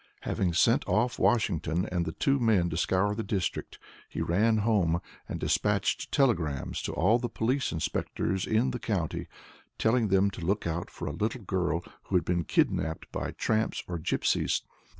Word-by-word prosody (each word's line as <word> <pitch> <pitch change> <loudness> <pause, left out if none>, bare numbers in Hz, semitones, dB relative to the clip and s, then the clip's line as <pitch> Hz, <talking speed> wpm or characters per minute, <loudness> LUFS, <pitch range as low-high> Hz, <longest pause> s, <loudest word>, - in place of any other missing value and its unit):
Having 90 -3 -1
sent - - +4
off 115 +6 +1
Washington 90 -7 +1
and 85 -2 0
the - - -1
two 140 - +1
men 105 -8 +3
to - - -2
scour 95 +4 +1
the 110 - -3
district, 100 -5 -3 0.3
he - - -5
ran 110 +6 +2
home, 90 -7 +2 0.3
and - - -4
dispatched - - 0
telegrams 85 - +1
to - - -3
all 115 +3 +3
the 120 0 -3
police 125 +4 0
inspectors 90 +3 -2
in 110 +4 +2
the 125 - -4
county, 95 -9 -2 0.5
telling 115 0 +2
them 100 +1 +3
to 95 - -8
look 100 +5 0
out 85 +1 -2
for - - -7
a - - -1
little 110 +2 -2
girl 90 -3 -1 0.2
who 95 - -2
had 90 - +3
been 85 -2 0
kidnapped 80 +3 0
by - - -3
tramps 110 0 0
or 85 -1 -3
gipsies. 80 - +1
95 Hz, 170 wpm, -29 LUFS, 85-110 Hz, 0.5 s, sent